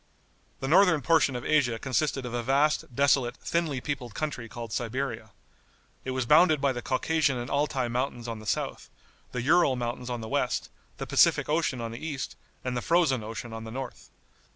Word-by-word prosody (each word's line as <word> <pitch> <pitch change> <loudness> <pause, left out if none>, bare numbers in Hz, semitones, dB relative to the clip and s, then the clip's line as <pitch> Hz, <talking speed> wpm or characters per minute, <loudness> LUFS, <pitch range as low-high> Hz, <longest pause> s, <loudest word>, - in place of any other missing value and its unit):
The 135 - -2
northern 165 -2 +5
portion 160 -4 +3
of 120 - -5
Asia 125 -7 +2
consisted 135 +2 -1
of 120 - -5
a 120 - -1
vast, 135 +1 +1
desolate, 135 -2 +2
thinly 165 -6 -1
peopled 125 -6 -4
country 135 -7 -3
called 115 -1 -7
Siberia. 120 -2 -3 0.7
It - - -5
was 130 -1 -1
bounded 155 +3 +5
by 140 0 +2
the 120 - -4
Caucasian 140 +1 +1
and 120 +1 -5
Altai 140 -3 0
mountains 120 0 -2
on 115 -2 -4
the 110 - -11
south, - - -2 0.4
the 125 -1 -3
Ural 155 -1 +4
mountains 120 0 -4
on 120 -1 -3
the 110 - -6
west, - - -1 0.3
the - - -4
Pacific - - +4
Ocean 150 -4 0
on 115 -1 -4
the 115 - -8
east, 145 -5 -4 0.3
and 125 -1 -1
the 120 - -1
Frozen 160 -8 +2
Ocean 115 +1 -6
on 115 0 -6
the 110 - -7
north. 130 +1 -7
130 Hz, 190 wpm, -28 LUFS, 120-145 Hz, 0.7 s, northern